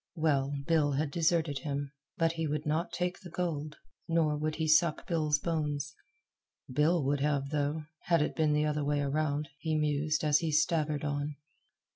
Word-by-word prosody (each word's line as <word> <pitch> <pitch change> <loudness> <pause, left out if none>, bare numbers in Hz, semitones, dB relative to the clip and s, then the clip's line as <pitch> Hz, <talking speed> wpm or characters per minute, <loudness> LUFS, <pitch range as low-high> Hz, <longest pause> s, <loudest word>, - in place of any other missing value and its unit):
Well, 145 -4 +1
Bill 155 -3 +2
had 145 +1 -1
deserted 160 -3 +1
him; 140 -2 -3 0.3
but 165 -2 +3
he 165 -1 -2
would 150 0 -2
not 155 +4 0
take 180 0 -2
the 185 - -10
gold, 155 -4 -3 0.3
nor 165 -2 +2
would 155 +1 -2
he 160 -1 -1
suck 155 +1 +3
Bill's 155 -4 +1
bones. 145 -3 -2 0.7
Bill 150 +5 +2
would 140 +1 +1
have, 140 -1 0
though, 150 +1 -1 0.2
had 170 -3 +3
it - - -3
been 155 -2 +2
the 150 0 +2
other 150 -1 0
way 145 0 +1
around, 145 +1 -1
he 160 +1 -1
mused 150 0 0
as 150 -1 +4
he 165 -2 -1
staggered 155 -1 +1
on. 145 0 -2
150 Hz, 175 wpm, -31 LUFS, 145-160 Hz, 0.7 s, as